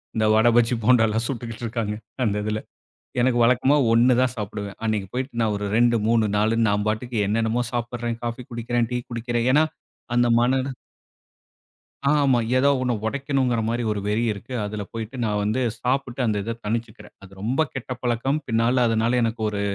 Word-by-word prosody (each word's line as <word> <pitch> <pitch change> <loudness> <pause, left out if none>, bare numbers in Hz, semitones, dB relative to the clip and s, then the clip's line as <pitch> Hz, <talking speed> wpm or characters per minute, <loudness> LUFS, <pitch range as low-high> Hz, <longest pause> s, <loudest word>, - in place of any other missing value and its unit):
இந்த 110 -1 +2
வட, 110 +2 +4
பஜ்ஜி, 120 0 +4
போண்டால்லாம் 115 -1 +3
சுட்டுக்கிட்டு 115 -3 -6
இருக்காங்க. 115 -2 -2 0.3
அந்த 105 -4 +1
இதில. 105 0 -1 0.6
எனக்கு 125 0 +2
வழக்கமா 125 +4 +4 0.2
1 120 +2 +5
தான் 130 -1 +1
சாப்பிடுவேன். 105 -1 -5
அன்னைக்கு 105 -3 -1
போயிட்டு 130 +2 -3
நான் 110 -2 +1
ஒரு 105 0 -3
2,3,4ன்னு 115 -1 +2
நான் 105 0 0
பாட்டுக்கு 115 +2 -2
என்னென்னமோ 115 +3 +1
சாப்பிடுறேன், 120 -1 -3
காஃபி 120 +2 -4
குடிக்கிறேன், 120 0 -1
டீ 125 - 0
குடிக்கிறேன். 120 0 -1
ஏனா 150 +2 +5 0.5
அந்த 120 0 +4
மன 130 +2 +2 1.5
அ, - - +5
ஆமா, 135 -3 +3 0.2
ஏதோ 140 +2 +4
ஒன்ன 125 -1 +1
உடைக்கணுங்கிற 135 -2 0
மாரி 120 +1 -1
ஒரு 105 - -3
வெறி 105 +3 +1
இருக்கு. 110 +5 -8
அதில 105 0 -4
போயிட்டு 115 +2 -6
நான் 105 -1 0
வந்து 110 +5 0 0.2
சாப்பிட்டு 130 0 -1
அந்த 110 -3 +1
இத 115 +3 -4
தனிச்சுக்கிறேன். 115 0 -4
அது 95 -1 -14
ரொம்ப 130 +8 +1
கெட்ட 130 -1 -5
பழக்கம்! 125 +4 0
பின்னால 120 +2 +2
அதனால 115 +2 +1
எனக்கு 115 0 -1
ஒரு 105 -1 -3
115 Hz, 165 wpm, -23 LUFS, 110-125 Hz, 1.5 s, 1